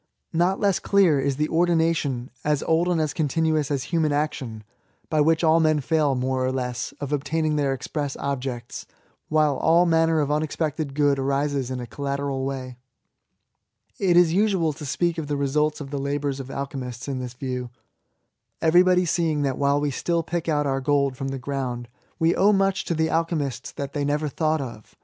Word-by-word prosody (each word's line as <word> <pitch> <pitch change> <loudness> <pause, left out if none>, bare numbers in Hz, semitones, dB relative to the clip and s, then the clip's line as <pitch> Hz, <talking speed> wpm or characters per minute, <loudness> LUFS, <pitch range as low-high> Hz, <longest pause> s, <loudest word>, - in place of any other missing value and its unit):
Not 175 +4 +2
less 200 -3 +2
clear 185 -8 +3
is 135 0 0
the 150 0 +1
ordination^ 165 -7 +1
as 150 -1 +1
old 165 +2 +2
and 175 -2 +1
as 155 -2 0
continuous 155 -1 0
as 140 -3 -1
human 160 -3 +2
action^ 140 -7 -2 0.5
by 155 -1 +3
which 160 +2 +3
men 160 -1 +4
fail> 145 -1 +1
more 130 0 -1
or 130 - +1
less, 125 -2 -3
of 145 0 -4
obtaining 155 +2 0
their 145 -2 +1
express 140 +1 -3
objects, 130 -3 -4 0.4
while 155 -2 +2
all 170 +2 +4
manner 165 -1 +3
of 145 -1 0
unexpected 150 -1 -2
good 145 -2 +2
arises 140 -1 0
in 130 -1 -3
a 120 - -5
collateral 140 +1 -3
way. 130 -2 -5 1.2
It 180 -3 +3
is 175 -2 +5
usual 190 -5 +2
to 150 +1 -9
speak 170 +4 0
of 155 - -4
the 145 - -1
resultsK 150 +2 0
of 140 -1 -7
the 140 - -2
labours 140 0 -2
of 135 -1 -7
alchemists 135 -3 -5
in 135 -2 -3
thiB 125 -1 -7
view, 125 -2 -4 0.9
everybody 180 +2 +4
seeing 160 -3 0
that 135 -2 -1
while 140 0 +2
we 145 -1 0
still 170 +5 -1
pick 170 0 -3
out 150 -1 +1
our 135 -1 0
gold 140 -1 +1
from 135 +1 -4
the 135 0 -3
ground, 130 -3 -4 0.3
we 165 0 +2
owe 200 +2 +4
much 195 -1 +1
to 170 - -1
the 160 0 +1
alchemists 155 -6 -1
that 140 -2 -5
they 145 - -1
never 150 +2 0
thought 155 +1 0
of. 115 -5 -9
145 Hz, 185 wpm, -24 LUFS, 135-160 Hz, 1.2 s, is